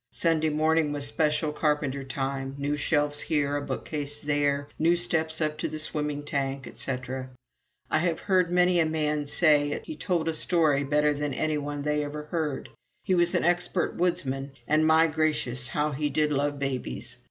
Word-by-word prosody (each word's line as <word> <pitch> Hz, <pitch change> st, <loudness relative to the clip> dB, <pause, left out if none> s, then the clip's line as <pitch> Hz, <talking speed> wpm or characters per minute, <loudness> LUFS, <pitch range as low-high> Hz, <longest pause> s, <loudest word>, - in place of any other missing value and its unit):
Sunday 160 Hz, -1 st, +1 dB
morning 155 Hz, 0 st, +2 dB
was 145 Hz, -1 st, -1 dB
special 150 Hz, +1 st, +1 dB
carpenter 150 Hz, -3 st, 0 dB
time 135 Hz, 0 st, -3 dB
new 145 Hz, +1 st, -1 dB
shelves 145 Hz, 0 st, +1 dB
here, 145 Hz, -3 st, 0 dB
a 145 Hz, -, -1 dB
bookcase 145 Hz, 0 st, -3 dB
there, 145 Hz, -1 st, 0 dB
new 170 Hz, +2 st, +4 dB
steps 160 Hz, -2 st, 0 dB
up 155 Hz, 0 st, -1 dB
to -, -, -1 dB
the 155 Hz, -, -5 dB
swimming 150 Hz, -1 st, -2 dB
tank, 135 Hz, -2 st, -2 dB
etc. 130 Hz, +2 st, -4 dB, 0.6 s
I -, -, +2 dB
have 170 Hz, -1 st, 0 dB
heard 185 Hz, -3 st, +2 dB
many 180 Hz, 0 st, +4 dB
a 165 Hz, -, +4 dB
man 150 Hz, -2 st, -1 dB
say 150 Hz, -1 st, +4 dB
that 145 Hz, -, -4 dB
he 315 Hz, -, -6 dB
told 175 Hz, -, -1 dB
a 165 Hz, -, +1 dB
story 155 Hz, -4 st, +2 dB
better 150 Hz, +1 st, +2 dB
than 145 Hz, -2 st, -3 dB
any 155 Hz, -1 st, 0 dB
one 145 Hz, 0 st, -4 dB
they 150 Hz, 0 st, 0 dB
ever 150 Hz, +1 st, -5 dB
heard. 150 Hz, -3 st, -3 dB, 0.3 s
He 185 Hz, -, +1 dB
was 175 Hz, -1 st, +3 dB
an -, -, +2 dB
expert 175 Hz, +1 st, +1 dB
woodsman. 140 Hz, -6 st, -1 dB
And, 155 Hz, +1 st, +3 dB
my 160 Hz, +1 st, +6 dB
gracious! 150 Hz, -6 st, 0 dB
how 150 Hz, +6 st, -1 dB
he 150 Hz, +1 st, -1 dB
did 150 Hz, +1 st, +1 dB
love 145 Hz, 0 st, 0 dB
babies! 130 Hz, -3 st, -3 dB
150 Hz, 180 wpm, -27 LUFS, 140-160 Hz, 0.6 s, my